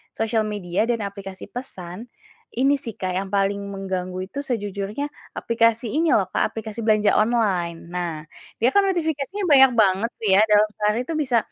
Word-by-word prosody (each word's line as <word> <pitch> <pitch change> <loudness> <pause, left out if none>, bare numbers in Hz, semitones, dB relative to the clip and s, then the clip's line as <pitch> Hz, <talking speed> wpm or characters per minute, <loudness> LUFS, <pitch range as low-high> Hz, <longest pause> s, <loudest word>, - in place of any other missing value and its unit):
sosial 220 0 0
media 195 -2 -1
dan 235 -1 +1
aplikasi 195 -1 -8
pesan, 210 -3 -6 0.5
ini 275 +3 +3
sih, 230 -5 -5
Kak, 185 -1 -2
yang 195 0 -3
paling 200 0 +1
mengganggu 185 -1 -4
itu 280 - -6
sejujurnya 205 +2 -3 0.3
aplikasi 230 0 +1
ini 325 0 +2
loh, 195 -3 +2
Kak, - - 0
aplikasi 220 0 -6
belanja 215 -1 +3
online. 195 -7 +1
Nah, 175 -2 -2 0.5
dia 245 - +5
kan 400 - +6
notifikasinya 330 +1 -2
banyak 265 -2 +7
banget 210 0 +3
tuh 220 - -2
ya - - +6
dalam 210 +1 +5
sehari 210 +2 +1
itu 330 - -4
bisa 255 -6 +1
215 Hz, 165 wpm, -23 LUFS, 195-245 Hz, 0.5 s, banyak